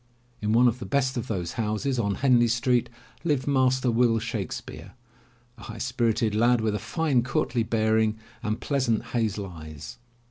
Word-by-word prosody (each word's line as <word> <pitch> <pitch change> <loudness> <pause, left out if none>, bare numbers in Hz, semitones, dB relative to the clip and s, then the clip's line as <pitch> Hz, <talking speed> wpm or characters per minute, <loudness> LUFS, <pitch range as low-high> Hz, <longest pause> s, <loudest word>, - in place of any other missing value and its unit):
In 105 0 0
one 120 +3 +5
of 120 +1 0
the - - -6
best 135 -2 +1
of 120 - -3
those 90 -5 -3
houses 115 +5 -1
on 100 -3 0
Henley 125 -3 +4
Street, 120 +1 +1 0.3
lived 145 -6 0
Master 130 -2 +2
Will 115 -1 +3
Shakespeare, 110 -5 -5 0.7
a - - -13
high 115 +2 -8
spirited 115 -3 0
lad, 120 +3 +3
with 110 -1 0
a 105 - -2
fine, 130 +3 +1
courtly 120 -1 -1
bearing 110 -1 +1 0.2
and 105 +1 -2
pleasant 130 -6 0
hazel 110 -4 0
eyes. 80 -5 -10
115 Hz, 165 wpm, -26 LUFS, 110-125 Hz, 0.7 s, one